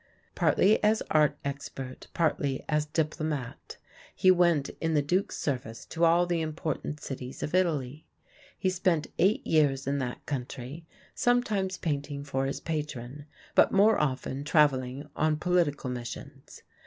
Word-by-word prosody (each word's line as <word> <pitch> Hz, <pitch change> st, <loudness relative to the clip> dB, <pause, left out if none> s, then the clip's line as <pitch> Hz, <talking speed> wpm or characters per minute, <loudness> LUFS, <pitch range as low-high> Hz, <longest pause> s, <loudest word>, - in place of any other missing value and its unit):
Partly 210 Hz, +2 st, +3 dB
as 215 Hz, +1 st, +3 dB
art 150 Hz, -1 st, +3 dB
expert, 135 Hz, -2 st, -6 dB
partly 145 Hz, -5 st, 0 dB
as 150 Hz, -1 st, 0 dB
diplomat, 155 Hz, -4 st, -3 dB, 0.4 s
he 185 Hz, -, +5 dB
went 170 Hz, -5 st, +3 dB
in 160 Hz, -1 st, +1 dB
the 150 Hz, -, +4 dB
Duke's 180 Hz, +7 st, 0 dB
service 125 Hz, -5 st, -3 dB
to 165 Hz, -, -3 dB
all 170 Hz, +2 st, +4 dB
the 175 Hz, -2 st, 0 dB
important 155 Hz, -1 st, -3 dB
cities 130 Hz, -2 st, -6 dB
of 150 Hz, -, -4 dB
Italy. 155 Hz, -6 st, 0 dB, 0.5 s
He 185 Hz, -, +1 dB
spent 175 Hz, -4 st, +1 dB
eight 195 Hz, +4 st, +3 dB
years 145 Hz, -4 st, +2 dB
in 140 Hz, +1 st, 0 dB
that 125 Hz, -2 st, -4 dB
country, 135 Hz, +3 st, -5 dB, 0.3 s
sometimes 210 Hz, -6 st, +1 dB
painting 145 Hz, -2 st, -3 dB
for 135 Hz, -1 st, -1 dB
his 135 Hz, -, -3 dB
patron, 145 Hz, -3 st, -5 dB, 0.3 s
but -, -, +5 dB
more 210 Hz, +3 st, +5 dB
often 135 Hz, -1 st, -2 dB
travelling 145 Hz, -3 st, +2 dB
on 155 Hz, 0 st, +1 dB
political 160 Hz, -6 st, +1 dB
missions. 120 Hz, -1 st, -8 dB
150 Hz, 140 wpm, -28 LUFS, 135-170 Hz, 0.5 s, he